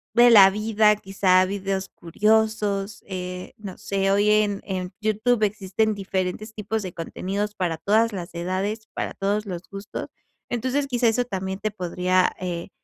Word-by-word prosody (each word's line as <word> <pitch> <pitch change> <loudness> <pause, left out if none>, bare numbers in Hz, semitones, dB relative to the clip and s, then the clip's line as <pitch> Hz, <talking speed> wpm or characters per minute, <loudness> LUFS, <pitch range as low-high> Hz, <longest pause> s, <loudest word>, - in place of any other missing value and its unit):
de 240 0 +7
la 195 -4 +9
vida, 210 +1 +3
quizá 190 -2 +3
videos 195 0 -3
curiosos, 210 +1 0
eh, 180 -1 -6
no 200 -3 -8
sé. 195 0 -1
Hoy 205 +1 +3
en 210 -2 +2
en 185 -1 -4
YouTube 215 +2 +1
existen 210 +1 0
diferentes 195 +2 -3
tipos 220 +1 -3
de 185 -3 -6
contenidos 200 +5 -4
para 175 -3 -1
todas 220 +6 +2
las 175 -3 -6
edades, 190 +5 -3
para - - -3
todos 205 +2 -1
los 180 -3 -6
gustos. 195 0 -6 0.4
Entonces, 260 +4 -1
quizá 245 -2 +1
eso 245 +2 +1
también 190 -3 -4
te 215 - -2
podría, 185 -1 +1
eh, 175 -2 -4
200 Hz, 155 wpm, -24 LUFS, 185-215 Hz, 0.4 s, la